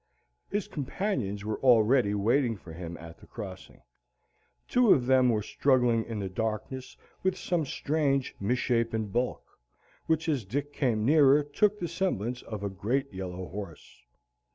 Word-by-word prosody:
His 205 0 -2
companions 130 - -3
were 110 0 -2
already 120 -3 +4
waiting 115 +3 +2
for 85 -4 -12
him 85 0 -7
at 80 0 -11
the - - -16
crossing. 95 -5 -9 0.9
Two 245 -4 +4
of 125 - -1
them 130 -1 +4
were 110 -3 +1
struggling 125 -3 +2
in 115 -2 -5
the 100 -2 -3
darkness 110 +6 -4 0.2
with 190 0 0
some 170 -5 -1
strange 140 -2 0
misshapen 115 -1 0
bulk, 120 +4 -1 0.6
which 160 0 +1
as 145 -7 0
Dick 145 +9 -3
came 115 -7 0
nearer 145 0 +6
took 200 +9 +1
the 175 - -3
semblance 125 - -2
of 105 -3 -7
a - - 0
great 120 +7 -2
yellow 95 -1 -5
horse. 90 -10 -9
120 Hz, 150 wpm, -29 LUFS, 105-145 Hz, 0.9 s, nearer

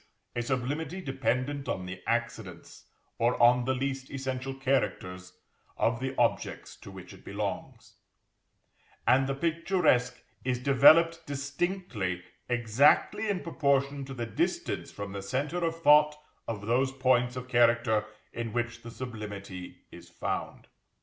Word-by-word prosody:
_, - - -31 0.3
a 120 - 0
sublimity 140 +8 -2
dependent 135 -2 -2
on 90 - -2
the 90 +1 -7
accidents, - - -3 0.3
or 120 +2 +2
on 120 +1 +5
the 130 +1 +1
least 135 0 -3
essential 135 0 -4
characters, 90 -9 -2 0.4
of 115 0 +1
the 130 +1 -3
objects - - 0
to - - -13
which - - -11
it - - -15
belongs; - - -5 1.1
and 135 +1 +4
the 135 - -1
picturesque 165 -4 +1 0.2
is 125 -1 0
_developed 155 +6 +6
distinctively 140 - -2 0.3
exactly 125 - +3
in 195 -2 0
proportion 140 -3 0
to 135 0 -8
the 120 -2 -3
distance 115 - -2
from 100 -1 -6
the 100 0 -5
centre 145 - -2
of 165 0 -1
thought 150 0 +6 0.3
of 105 -3 -4
those 130 +4 +2
points 125 -2 +2
of 125 0 -6
character 115 -3 +3 0.3
in 115 -1 -4
which 120 0 -2
the 115 - -9
sublimity 105 -7 -7
is - - -13
found_. - - -4
130 Hz, 135 wpm, -29 LUFS, 120-140 Hz, 1.1 s, developed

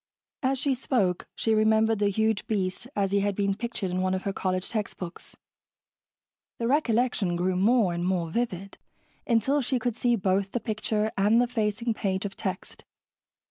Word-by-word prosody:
As 265 -1 +1
she 275 +1 +1
spoke, 220 -8 0
she 225 - +1
remembered 220 0 +3
the 205 -1 +3
huge 220 +1 0
beast 200 0 -2
as 195 -1 0
he 200 - +3
had 200 0 0
been 200 0 +1
pictured 225 -3 -4
in 185 +1 -1
one 185 0 +1
of 185 - -4
her 195 - -2
college 185 -1 -1
textbooks. 195 -5 -5 1.2
The 230 - -1
recollection 240 - +1
grew 180 +1 0
more 205 0 +3
and 170 0 -2
more 180 -2 0
vivid, 195 -3 -3 0.5
until 265 +5 +2
she 255 +1 0
could 240 -1 -2
see 240 0 +2
both 195 -1 0
the 240 - 0
picture 215 -1 -1
and 210 +4 +4
the 245 - +4
facing 230 -1 -1
page 190 -2 -2
of 195 - -5
text. 190 -3 -5
210 Hz, 175 wpm, -27 LUFS, 190-235 Hz, 1.2 s, and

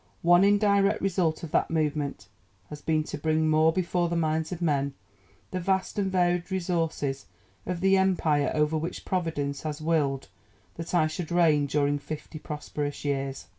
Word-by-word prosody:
One 175 +2 +6
indirect 200 0 +3
result 175 -5 0
of 160 - -6
that - - +2
movement 150 - -1 0.4
has 150 -1 -8
been 155 0 +1
to 150 - -6
bring 155 +1 +1
more 155 +1 +4
before 175 0 0
the 170 - -1
minds 160 0 0
of 180 - -4
men 140 -5 0 0.6
the 185 - -2
vast 190 +2 -1
and 195 -1 0
varied 175 -1 +1
resources 165 - -2 0.4
of 180 -1 -3
the 195 0 +4
Empire 165 -6 +2
over 150 +1 +1
which 165 +3 -5
Providence 160 -6 -2
has 155 -1 -4
willed 150 -4 0 0.5
that 165 +2 -5
I 165 -3 +4
should 155 +1 -4
reign 155 -4 +3
during 145 0 +1
fifty 155 +1 -7
prosperous 150 -1 -5
years. 135 -1 -2
160 Hz, 165 wpm, -27 LUFS, 150-175 Hz, 0.6 s, One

